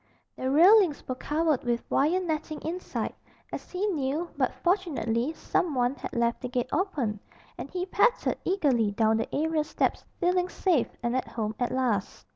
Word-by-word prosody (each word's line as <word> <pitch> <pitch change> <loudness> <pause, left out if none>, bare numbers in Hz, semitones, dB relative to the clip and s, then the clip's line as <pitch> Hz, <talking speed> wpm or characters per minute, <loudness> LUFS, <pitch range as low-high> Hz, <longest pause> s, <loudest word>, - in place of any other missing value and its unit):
The 260 - -2
railings 350 +2 +5
were 255 - -1
covered 300 +2 0
with 240 -1 -1
wire 315 +7 +2
netting 315 -3 -3
inside, 350 +3 -3 0.4
as - - -6
he 370 +3 -2
knew, 315 -2 -1
but - - 0
fortunately 305 - +1
some 320 -1 -1
one 245 0 +2
had - - -7
left 235 0 0
the 250 - -4
gate 245 0 -1
open, 270 - -1 0.4
and - - -7
he 365 0 -3
pattered 410 +5 +2
eagerly 275 - +2
down 220 +1 +2
the 225 - -2
area 315 +1 +1
steps 305 - -1 0.2
feeling 360 0 +2
safe 350 -10 +1
and 240 +1 0
at 260 - -1
home 215 -2 -3
at 245 - +1
last. 240 -6 -1
295 Hz, 170 wpm, -28 LUFS, 245-355 Hz, 0.4 s, railings